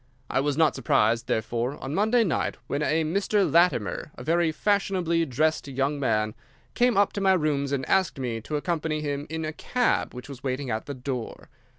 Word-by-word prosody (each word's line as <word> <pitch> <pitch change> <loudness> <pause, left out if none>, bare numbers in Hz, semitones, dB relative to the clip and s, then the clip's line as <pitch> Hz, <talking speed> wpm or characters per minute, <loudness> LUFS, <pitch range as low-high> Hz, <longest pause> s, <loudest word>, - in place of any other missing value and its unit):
I - - +2
was 145 +1 0
not 155 -5 +4
surprised, 115 +3 +2
therefore, 120 +4 -1
on 135 - -6
Monday 220 +6 +3
night 165 - -1
when 140 +4 -2
a 155 +1 +1
Mr. 195 +5 +1
Latimer, 160 - +2
a - - -9
very 170 0 +2
fashionably 185 -3 +1
dressed 155 +4 0
young 140 +2 -1
man, 110 -5 +1 0.4
came 245 -3 +2
up 200 0 +3
to 200 - -3
my 190 -1 +4
rooms 145 -5 0
and 135 -2 -1
asked 190 -6 +2
me 120 -4 -3
to 150 - -5
accompany 155 0 -1
him 145 0 -3
in 160 0 -3
a 155 - -4
cab 245 - 0
which 125 - -8
was 135 -3 -9
waiting 130 -1 -2
at 110 0 -3
the 140 - -4
door. 125 -2 -5
150 Hz, 195 wpm, -26 LUFS, 130-170 Hz, 0.4 s, not